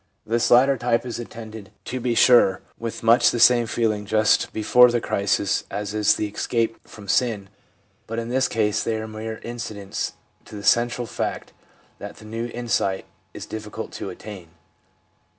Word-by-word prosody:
This 115 Hz, +2 st, +1 dB
latter 135 Hz, +3 st, +5 dB
type 120 Hz, 0 st, 0 dB
is 120 Hz, -1 st, -5 dB
attended, 110 Hz, -3 st, -9 dB, 0.2 s
to 130 Hz, -, -4 dB
be 120 Hz, -1 st, -1 dB
sure, 120 Hz, -6 st, +5 dB, 0.2 s
with 115 Hz, -1 st, -5 dB
much 115 Hz, +2 st, +5 dB
the 120 Hz, -, -2 dB
same 120 Hz, -1 st, +5 dB
feelings 110 Hz, -3 st, -1 dB
just 110 Hz, 0 st, +2 dB
before 125 Hz, +3 st, +5 dB
the 120 Hz, 0 st, +1 dB
crisis 100 Hz, -2 st, 0 dB
as 105 Hz, 0 st, -4 dB
is 105 Hz, -1 st, +3 dB
the -, -, -2 dB
escape 115 Hz, +2 st, -2 dB
from 105 Hz, -2 st, -13 dB
sin, 105 Hz, -2 st, 0 dB, 0.6 s
but 115 Hz, -, -5 dB
in 115 Hz, 0 st, -3 dB
this 130 Hz, +1 st, +1 dB
case 105 Hz, -1 st, 0 dB
they 115 Hz, -, -1 dB
are 110 Hz, 0 st, -4 dB
mere 110 Hz, 0 st, -6 dB
incidents 110 Hz, -4 st, -5 dB, 0.3 s
to -, -, -11 dB
the 100 Hz, -, -8 dB
central 120 Hz, +3 st, +2 dB
fact -, -, -4 dB, 0.5 s
that -, -, -8 dB
the 110 Hz, -, -14 dB
new 115 Hz, +2 st, -4 dB
insight 115 Hz, -5 st, -1 dB, 0.3 s
is -, -, -7 dB
difficult 105 Hz, -1 st, -7 dB
to -, -, -6 dB
attain. 100 Hz, -5 st, -10 dB
115 Hz, 170 wpm, -23 LUFS, 105-120 Hz, 0.6 s, latter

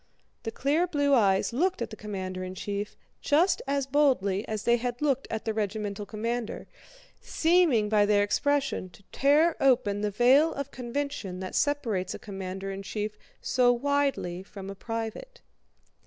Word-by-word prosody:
The 225 Hz, -, -4 dB
clear 295 Hz, +9 st, +1 dB
blue 285 Hz, -4 st, +1 dB
eyes 200 Hz, -3 st, +3 dB
looked 360 Hz, +9 st, +1 dB
at 230 Hz, -2 st, -4 dB
the -, -, -6 dB
commander 190 Hz, -3 st, -5 dB
in 185 Hz, 0 st, -6 dB
chief 205 Hz, +2 st, -4 dB, 0.3 s
just 330 Hz, +6 st, +3 dB
as 280 Hz, -1 st, 0 dB
boldly 255 Hz, -9 st, +2 dB
as 215 Hz, -2 st, -3 dB
they 235 Hz, 0 st, +4 dB
had 245 Hz, 0 st, -3 dB
looked 275 Hz, -3 st, 0 dB
at 220 Hz, -, -4 dB
the 220 Hz, -, 0 dB
regimental 210 Hz, -1 st, -3 dB
commander, 230 Hz, +1 st, -3 dB, 0.6 s
seeming 320 Hz, -10 st, +3 dB
by 210 Hz, -1 st, +3 dB
their 205 Hz, -1 st, +4 dB
expression 275 Hz, -1 st, 0 dB
to -, -, -23 dB
tear 300 Hz, +4 st, +3 dB
open 220 Hz, -7 st, +3 dB
the 210 Hz, -, 0 dB
veil 255 Hz, +9 st, +4 dB
of 280 Hz, 0 st, -5 dB
convention 250 Hz, -6 st, -4 dB
that 185 Hz, -, -5 dB
separates 230 Hz, -11 st, 0 dB
a -, -, -5 dB
commander 195 Hz, -1 st, -6 dB
in 195 Hz, 0 st, -5 dB
chief 210 Hz, +1 st, -4 dB, 0.3 s
so 250 Hz, -1 st, +3 dB
widely 270 Hz, -8 st, 0 dB
from 195 Hz, 0 st, -9 dB
a -, -, -8 dB
private. 230 Hz, -, -6 dB
230 Hz, 160 wpm, -28 LUFS, 205-280 Hz, 0.6 s, they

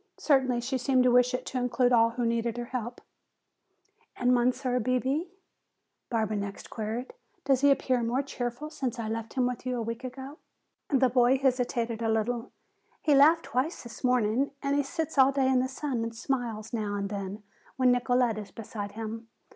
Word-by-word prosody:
Certainly 260 Hz, -4 st, +2 dB
she 260 Hz, +2 st, -2 dB
seemed 255 Hz, 0 st, +3 dB
to 250 Hz, -, +4 dB
wish 250 Hz, 0 st, +5 dB
it -, -, -5 dB
to 255 Hz, -, -3 dB
include 250 Hz, 0 st, +2 dB
all 230 Hz, -1 st, +5 dB
who 240 Hz, +1 st, -2 dB
needed 230 Hz, 0 st, 0 dB
her 240 Hz, -, -3 dB
help. 245 Hz, -1 st, -5 dB, 1.1 s
"And 250 Hz, 0 st, +2 dB
Monsieur 250 Hz, +1 st, +1 dB
Bebé?" 255 Hz, +7 st, 0 dB, 0.8 s
Barbara 220 Hz, -3 st, 0 dB
next 200 Hz, -1 st, -6 dB
queried. 225 Hz, -, -4 dB, 0.3 s
"Does 270 Hz, -2 st, +3 dB
he 285 Hz, -, +6 dB
appear 260 Hz, -2 st, +2 dB
more 240 Hz, +4 st, 0 dB
cheerful 255 Hz, +2 st, -5 dB
since 265 Hz, -7 st, -3 dB
I 230 Hz, -2 st, -3 dB
left 225 Hz, 0 st, -4 dB
him 255 Hz, -2 st, +1 dB
with 250 Hz, -1 st, -3 dB
you 255 Hz, -1 st, -2 dB
a -, -, -2 dB
week 230 Hz, +2 st, -5 dB
ago?" 265 Hz, +3 st, -8 dB, 0.5 s
The 265 Hz, -3 st, +3 dB
boy 250 Hz, +1 st, +4 dB
hesitated 245 Hz, -3 st, 0 dB
a 225 Hz, -, 0 dB
little. 230 Hz, +2 st, -1 dB, 0.5 s
"He 300 Hz, -, +2 dB
laughed 310 Hz, +4 st, +6 dB
twice 265 Hz, +8 st, -2 dB
this 235 Hz, 0 st, -11 dB
morning 250 Hz, +1 st, +2 dB
and 280 Hz, 0 st, +1 dB
he 285 Hz, -, +3 dB
sits 320 Hz, +1 st, -3 dB
all 265 Hz, +1 st, +7 dB
day 270 Hz, -1 st, +1 dB
in 260 Hz, -1 st, +3 dB
the 255 Hz, -, +1 dB
sun 265 Hz, -2 st, -3 dB
and 230 Hz, 0 st, -4 dB
smiles 230 Hz, -3 st, -3 dB
now 210 Hz, -3 st, -2 dB
and 200 Hz, 0 st, -2 dB
then 200 Hz, +1 st, -5 dB, 0.3 s
when 255 Hz, -1 st, +4 dB
Nicolete 245 Hz, -2 st, +2 dB
is 205 Hz, -, -8 dB
beside 205 Hz, -2 st, -7 dB
him. 225 Hz, +1 st, -6 dB
245 Hz, 185 wpm, -28 LUFS, 230-265 Hz, 1.1 s, all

